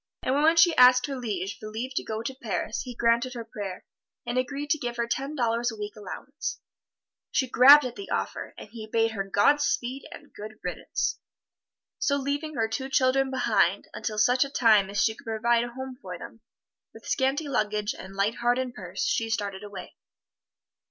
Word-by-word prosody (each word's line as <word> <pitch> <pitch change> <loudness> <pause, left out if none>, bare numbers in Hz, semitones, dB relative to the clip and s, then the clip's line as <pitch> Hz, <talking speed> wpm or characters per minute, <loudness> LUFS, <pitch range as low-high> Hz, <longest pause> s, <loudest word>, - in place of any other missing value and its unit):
And 260 - +1
when 320 +2 +5
she 330 0 +6
asked 250 0 +7
her 280 - -4
liege 205 -6 -4
for 215 - -7
leave 235 +5 -5
to - - -1
go 220 0 -4
to 265 - -3
Paris, 225 -3 -3
he 250 -2 -7
granted 235 +2 +1
her 230 -1 -6
prayer, 200 -4 -7 0.4
and 240 - -3
agreed 280 +3 -2
to 310 - +2
give 240 -3 -4
her 235 - 0
ten 270 +5 -3
dollars 235 -2 +1
a - - -8
week 210 -1 -6
allowance. 225 +8 -6 0.7
She 260 - +1
grabbed 275 +4 +8
at 245 - -5
the 400 - -8
offer, - - -3
and - - -9
he 220 0 -9
bade 225 +1 +1
her 200 -3 -3
Godspeed 255 +5 +1
and - - -12
good 215 +1 -9
riddance. - - -2 0.8
So 280 - +2
leaving 285 +3 -3
her 225 -1 +1
two 265 +4 -4
children 265 0 +2
behind, 260 -1 +1
until 215 -2 -4
such 250 +5 +4
a 275 - -6
time 215 -7 +4
as 205 +1 -2
she 220 - +2
could 265 - -17
provide 230 +1 +1
a - - -6
home 260 0 -6
for - - -7
them, - - -11 0.5
with - - -13
scanty 275 +3 0
luggage 210 -4 -1
and 190 +1 -10
light 200 +3 0
heart 240 +1 +2
and 255 -1 -2
purse, 185 -3 -5
she 225 0 0
started 205 -3 -3
away. 205 -1 -9
240 Hz, 195 wpm, -27 LUFS, 215-265 Hz, 0.8 s, grabbed